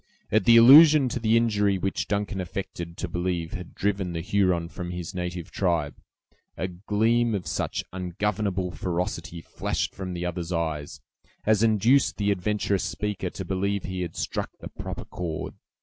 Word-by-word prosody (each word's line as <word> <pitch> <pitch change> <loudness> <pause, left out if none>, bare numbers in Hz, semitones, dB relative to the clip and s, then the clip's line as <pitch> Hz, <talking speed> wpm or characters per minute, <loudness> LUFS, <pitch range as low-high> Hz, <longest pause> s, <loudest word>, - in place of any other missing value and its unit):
At 110 -2 +3
the 115 0 +8
allusion 145 +3 +9
to 120 - -3
the 115 0 +3
injury 105 -4 +2
which 95 +1 -2
Duncan 100 -2 -1
affected 85 -2 -6
to 95 - -3
believe 85 -1 -2
had 90 -3 -7
driven 95 -3 -1
the 85 - -3
Huron 90 -2 +1
from 90 +1 -7
his 90 +1 -5
native 90 0 -5
tribe, 85 -6 -1 0.6
a 95 - -1
gleam 110 +5 +1
of 95 - -4
such - - -2
ungovernable 95 +1 -2
ferocity 85 -1 -3
flashed - - -3
from 95 -2 -5
the 85 0 -3
other's 90 0 -4
eyes, 80 -4 -3 0.4
as 110 -1 +3
induced 115 +5 +3
the 105 -1 +1
adventurous 100 0 0
speaker 105 -3 -3
to 95 - -7
believe 100 +2 -1
he 95 0 -4
had 85 -2 -4
struck - - -3
the - - -8
proper - - -7
chord. 80 -3 -5
95 Hz, 165 wpm, -26 LUFS, 90-105 Hz, 0.6 s, allusion